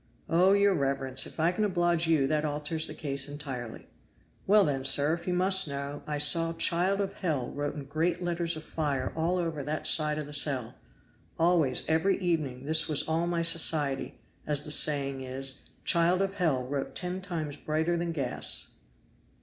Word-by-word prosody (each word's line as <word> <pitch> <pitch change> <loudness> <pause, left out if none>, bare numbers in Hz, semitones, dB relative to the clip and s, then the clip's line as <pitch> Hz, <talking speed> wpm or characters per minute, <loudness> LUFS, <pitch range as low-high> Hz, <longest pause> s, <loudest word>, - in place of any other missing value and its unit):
"Oh! 180 +4 +3
your 200 0 +3
reverence, 135 -3 +1
if - - -11
I 165 +2 +2
can 200 +4 -2
oblige 175 -4 +1
you 155 -4 +2
that 150 +2 0
alters 150 +1 -1
the - - -8
case 140 -2 -3
entirely. 135 -6 -7 0.6
Well, 205 +1 +5
then, 135 -3 -2
sir, 140 +3 +4
if 170 +1 -6
you 180 - 0
must 190 0 +4
know, 140 0 -5
I 150 -1 -2
saw 165 +3 +3
'Child 175 +4 +1
of 200 -1 -2
Hell' 150 -10 -3
wrote 145 +1 -4
in 145 - -6
great 165 +5 -1
letters 170 -1 -2
of 155 - -8
fire 145 -6 -3
all 165 +3 0
over 165 -4 -3
that 150 +3 -4
side 150 -1 +4
of 155 - -4
the 145 - -11
cell. 135 -5 0 0.6
Always 165 -6 +1
every 160 +5 +1
evening 155 -8 -2
this 160 +2 +4
was 150 -2 +2
all 165 +2 -1
my 170 -1 -1
society, 150 -5 +1 0.3
as 150 -1 +3
the 150 - -4
saying 140 -3 +3
is; 130 +1 -5 0.2
'Child 175 +3 +2
of 195 0 -3
Hell' 160 -10 0
wrote 135 +1 -5
ten 180 +1 -4
times 160 -6 -5
brighter 160 +3 -2
than 170 0 -3
gas. 140 -6 -2
155 Hz, 180 wpm, -28 LUFS, 140-170 Hz, 0.6 s, Well